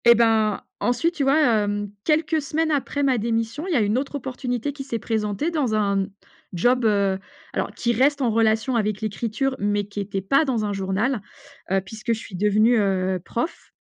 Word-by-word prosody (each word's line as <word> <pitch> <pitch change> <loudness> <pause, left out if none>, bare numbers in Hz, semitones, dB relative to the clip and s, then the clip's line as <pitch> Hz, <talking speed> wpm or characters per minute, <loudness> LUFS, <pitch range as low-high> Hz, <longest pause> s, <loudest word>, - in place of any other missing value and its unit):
Et 235 0 +8
ben, 220 -2 +3 0.2
ensuite, 330 +8 +1
tu 335 - -4
vois, 275 +3 +4
hem, 205 -6 +1
quelques 315 0 +2
semaines 315 +3 -1
après 285 0 -1
ma 260 -3 +2
démission, 230 - -2
il 365 - -1
y - - +2
a 240 - +4
1 210 +4 +2
autre 280 +1 -5
opportunité 255 0 -3
qui 275 -1 -6
s'est 265 -4 -3
présentée 220 - -1
dans 275 -9 0
un 200 -2 +1 0.5
job, 245 +7 +2
heu, 200 -3 +2 0.3
alors - - -2
qui 235 0 0
reste 280 +5 +3
en 245 -3 +2
relation 225 +3 +2
avec 210 -3 0
l'écriture, 230 +5 -1
mais 205 0 +1
qui 205 0 -6
était 195 -1 -3
pas 275 +11 +3
dans 240 -7 0
un 205 - -2
journal, 200 +5 -1 0.5
heu, 195 0 +3
puisque 220 +3 -3
je 225 - -4
suis 220 - -11
devenue, 215 +5 +3
heu, 190 -2 0
prof, 240 - -4
225 Hz, 195 wpm, -23 LUFS, 205-270 Hz, 0.5 s, Et